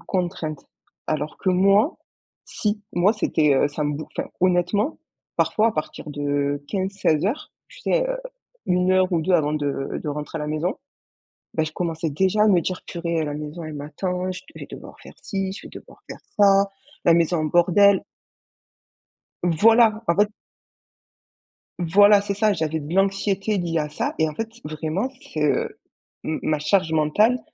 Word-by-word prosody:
contrainte. 170 -5 -3 0.4
Alors 155 0 -3
que - - -2
moi, 195 - +4 0.5
si. 210 0 -2
Moi 180 +4 +3
c'était, 155 -8 +2
heu 135 - +3
ça 150 +1 -3
me 145 0 -1
bouf 155 +2 -6
enfin - - -2
honnêtement, 185 - +1 0.4
parfois 220 +1 +3
à - - -2
partir 155 -1 -5
de 145 0 -1
15:00-16:00, 195 - 0 0.2
tu - - -15
sais - - +1
heu, - - -2 0.5
1 180 +1 +2
heure 185 0 +3
ou 170 - +2
2 185 +4 0
avant 155 -4 +3
de 145 -2 -2
de - - -4
rentrer 150 +2 -5
à - - -4
la - - -3
maison, 155 +5 -1 0.8
ben, 160 - +1
je 155 - -6
commençais 165 -1 -2
déjà 190 +7 +2
à - - +4
me 185 -4 +5
dire: 185 +3 -3
«Purée, 170 -1 -2
la 145 -1 -4
maison 150 +3 -6
elle 155 -1 -6
m'attend, 180 +6 -3
je 180 - -7
d - - -28
vais - - -7
devoir - - -10
faire - - -13
ci, 195 -3 -3
je 195 - -9
vais - - -11
devoir - - -13
faire - - -9 0.2
ça, 200 -1 +5 0.4
la 170 - +6
maison 170 +1 +2
en 155 - 0
bordel». 185 +5 +4 1.4
Voilà! 220 +6 +4
En 170 - +3
fait 205 +1 +3 1.5
Voilà, 205 +4 +6
c'est 200 0 -2
ça, 215 +1 +2
j'avais 160 -4 -1
de 150 +3 -6
l'anxiété 195 +2 +1
liée 170 -2 -1
à 150 - -1
ça 150 - -2
et 160 - +3
en 155 - -5
fait, 225 +4 -3 0.2
vraiment, 155 +9 -2
c'est, 155 - -6
heu, 150 - 0 0.5
m 155 - -1
ma 155 -1 0
charge 160 +2 +1
mentale, 185 +11 +3
175 Hz, 175 wpm, -23 LUFS, 155-200 Hz, 1.5 s, la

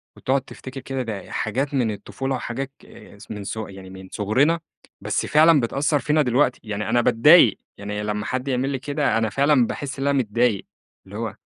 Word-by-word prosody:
وتقعُد 135 +1 0
تفتكر 130 +1 -9
كده، 135 0 -4
ده 110 -5 -6
حاجات 135 +7 -2
من 120 -5 +1
الطفولة 130 +6 -4
وحاجات 130 +2 -4
ك - - -15
ص - - -12
من 105 -2 -6
ص 105 - -5
يعني 95 -3 -7
من 95 0 -11
صغرنا، 130 +11 +2 0.4
بس - - -1
فعلًا 155 0 +5
بتأثّر 140 +4 0
فينا 150 +2 +2
دلوقتي. 125 0 +2
يعني 105 -1 -4
أنا 120 +1 +3
باتضايق 120 - +6 0.2
يعني 105 +1 -4
لمّا 105 0 -2
حد 130 +4 -3
يعمل 130 0 0
لي 135 -2 -2
كده، 145 -1 0
أنا 110 -1 +1
فعلًا 135 +1 +3
باحس 140 -1 -5
إن 140 - -1
أنا 140 0 +2
متضايق، 115 -2 +1 0.4
اللي 100 +2 -8
هو 110 -3 -4
125 Hz, 195 wpm, -23 LUFS, 105-140 Hz, 0.4 s, باتضايق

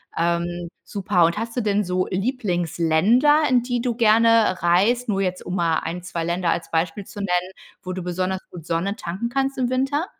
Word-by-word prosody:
Ähm, 170 +1 -1
super, 200 -4 +1
und 170 +5 0
hast 230 +2 -5
du 245 - +2
denn 210 -1 +1
so 185 0 -1
Lieblingsländer, 195 - +2
in 245 -2 +3
die 245 -1 -2
du 240 -1 -1
gerne 225 -3 +4
reist, 210 +8 +2
nur 195 -1 +1
jetzt 185 -1 -2
um 180 - -4
mal 165 -3 +1
ein, 175 +1 -5
2 170 -2 -4
Länder 170 0 0
als 165 0 -3
Beispiel 165 +4 -1
zu 210 - -14
nennen, 180 -2 -1 0.3
wo 185 - -5
du 185 -1 -5
besonders 185 +1 -2
gut 175 -3 -9
Sonne 175 +5 -1
tanken 195 +4 -4
kannst 270 +2 -1
im 255 -1 0
Winter? 275 +5 0
190 Hz, 195 wpm, -22 LUFS, 175-235 Hz, 0.3 s, gerne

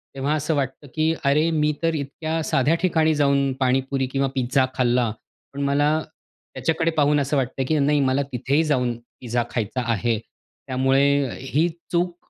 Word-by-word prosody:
तेव्हा 135 +2 -1
असं 155 +1 -1
वाटतं 140 +1 -3
की 160 +1 +2
"अरे, 150 +4 +3
मी 150 -1 +2
तर 165 0 +2
इतक्या 155 +3 -3
साध्या 145 +4 +2
ठिकाणी 160 -3 +2
जाऊन 140 -1 +2
पाणीपुरी 135 +1 +1
किंवा 135 0 +1
पिझ्झा 130 +1 +2
खाल्ला 120 -2 +2 0.4
पण 140 - -5
मला 145 +1 +2 0.7
त्याच्याकडे 160 +5 0
पाहून 150 -2 +2
असं 140 +1 0
वाटतंय 130 0 -1
हे - - -6
की 155 - +1
नाही 150 0 +3
मला 135 +1 +2
तिथेही 135 +5 +1
जाऊन 125 -6 +1 0.3
पिझ्झा 120 -1 -1
खायचा 120 +2 -2
आहे." 115 +1 0
त्यामुळे 135 +4 0
ही 145 +6 +1 0.2
चूक 175 0 0
140 Hz, 160 wpm, -23 LUFS, 130-155 Hz, 0.7 s, अरे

